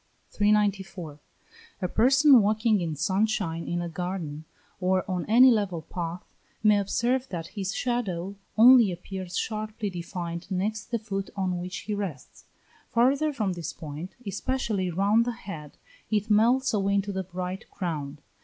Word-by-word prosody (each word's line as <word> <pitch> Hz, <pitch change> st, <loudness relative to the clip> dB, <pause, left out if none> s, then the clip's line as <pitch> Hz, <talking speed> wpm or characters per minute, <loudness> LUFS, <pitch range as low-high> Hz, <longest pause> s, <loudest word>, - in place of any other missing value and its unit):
394. 195 Hz, -7 st, 0 dB, 0.6 s
A 185 Hz, -, -1 dB
person 265 Hz, -, +6 dB
walking 215 Hz, 0 st, +2 dB
in 160 Hz, -3 st, -2 dB
sun 190 Hz, +7 st, +1 dB
shine 170 Hz, -6 st, -2 dB
in 175 Hz, 0 st, -1 dB
a -, -, -3 dB
garden, 165 Hz, -3 st, -4 dB, 0.3 s
or 185 Hz, 0 st, +1 dB
on 180 Hz, -3 st, -2 dB
any 250 Hz, +4 st, +7 dB
level 195 Hz, -7 st, 0 dB
path, 170 Hz, +1 st, -5 dB, 0.4 s
may 210 Hz, -1 st, +5 dB
observe 245 Hz, +6 st, 0 dB
that 165 Hz, -2 st, -5 dB
his 195 Hz, -3 st, -3 dB
shadow 200 Hz, -7 st, -2 dB, 0.2 s
only 235 Hz, -2 st, +8 dB
appears 185 Hz, 0 st, -6 dB
sharply 215 Hz, -1 st, -3 dB
defined 170 Hz, -1 st, -5 dB
next 205 Hz, +3 st, -2 dB
the 235 Hz, -, 0 dB
foot 195 Hz, -3 st, -4 dB
on 185 Hz, -2 st, -1 dB
which 180 Hz, +2 st, -5 dB
he 210 Hz, -, -4 dB
rests; 190 Hz, -10 st, -6 dB, 0.4 s
farther 270 Hz, +6 st, +3 dB
from 215 Hz, -9 st, -1 dB
this 170 Hz, -3 st, -5 dB
point, 155 Hz, +4 st, -8 dB
especially 200 Hz, -1 st, -1 dB
round 200 Hz, +6 st, +3 dB
the 240 Hz, 0 st, -2 dB
head, 165 Hz, -10 st, -9 dB, 0.3 s
it 215 Hz, 0 st, 0 dB
melts 240 Hz, +5 st, +4 dB
away 200 Hz, -1 st, +1 dB
into 200 Hz, 0 st, 0 dB
the 190 Hz, -1 st, -2 dB
bright 185 Hz, +1 st, -5 dB
ground. 150 Hz, -5 st, -4 dB
195 Hz, 150 wpm, -27 LUFS, 175-220 Hz, 0.6 s, only